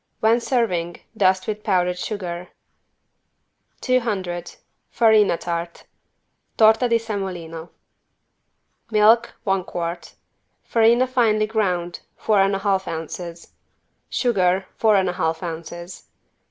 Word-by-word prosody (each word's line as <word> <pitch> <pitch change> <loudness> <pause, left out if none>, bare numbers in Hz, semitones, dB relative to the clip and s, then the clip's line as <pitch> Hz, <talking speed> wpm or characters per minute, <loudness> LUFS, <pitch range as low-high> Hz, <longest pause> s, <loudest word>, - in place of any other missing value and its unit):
When 225 +2 +3
serving 180 -10 -1 0.2
dust 185 -2 +2
with 210 -1 -4
powdered 180 -3 +1
sugar. 180 -4 -5 1.3
200 205 -9 -1 0.3
FARINA 220 -6 +4
TART 170 0 -5 0.7
(Torta 220 +3 +5
di 230 - +4
semolino) 180 -7 -5 1.2
Milk, 220 +1 +4
one 195 -1 0
quart. 170 0 -5 0.5
Farina 235 +2 +3
finely 230 -4 +2
ground, 185 -6 -1 0.2
four 210 -3 +2
and 195 0 +2
a - - -2
half 190 -1 +1
ounces. 165 +1 -7 0.6
Sugar, 190 -6 +1
four 220 -2 +3
and 190 -1 +2
a 180 - -1
half 160 -2 -2
ounces. 170 +1 -7
190 Hz, 105 wpm, -22 LUFS, 175-220 Hz, 1.3 s, Torta